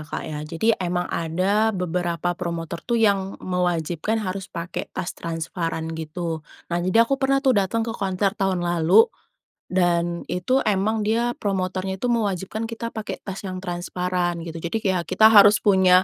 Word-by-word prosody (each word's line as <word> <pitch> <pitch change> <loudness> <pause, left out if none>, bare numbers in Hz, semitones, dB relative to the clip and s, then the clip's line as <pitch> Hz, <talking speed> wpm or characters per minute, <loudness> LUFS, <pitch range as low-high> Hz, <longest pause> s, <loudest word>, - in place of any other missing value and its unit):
Kak, 155 - -6
ya. 155 -2 -5
Jadi 175 +8 +2
emang 180 0 -1
ada 195 +6 +1
beberapa 175 0 -1
promotor 170 -1 -4
tuh 235 - +2
yang 200 -3 +2
mewajibkan 180 +2 -1
harus 195 -3 -4
pakai 170 +2 -5
tas 175 - -4
transparan, 165 0 -4
gitu. 160 0 -4 0.3
Nah, 175 - +1
jadi 185 +6 +4
aku 275 +3 -1
pernah 275 +1 +2
tuh 260 - +5
datang 215 +2 +1
ke 230 - -3
konser 195 -1 0
tahun 190 -4 -1
lalu 175 +5 +5 0.7
dan 175 -1 +1
itu 255 +9 +1
emang 210 +2 +1
dia 230 +3 +1
promotornya 190 -1 -2
itu 240 +5 -1
mewajibkan 215 0 -1
kita 230 0 -5
pakai 220 -1 -5
tas 195 -1 -6
yang 185 0 -4
transparan, 175 0 -2
gitu. 165 0 -6
Jadi 170 +6 -2
kayak 185 -3 0
kita 185 +4 +4
harus 205 0 +8
punya, 185 -2 +5
185 Hz, 160 wpm, -23 LUFS, 175-210 Hz, 0.7 s, harus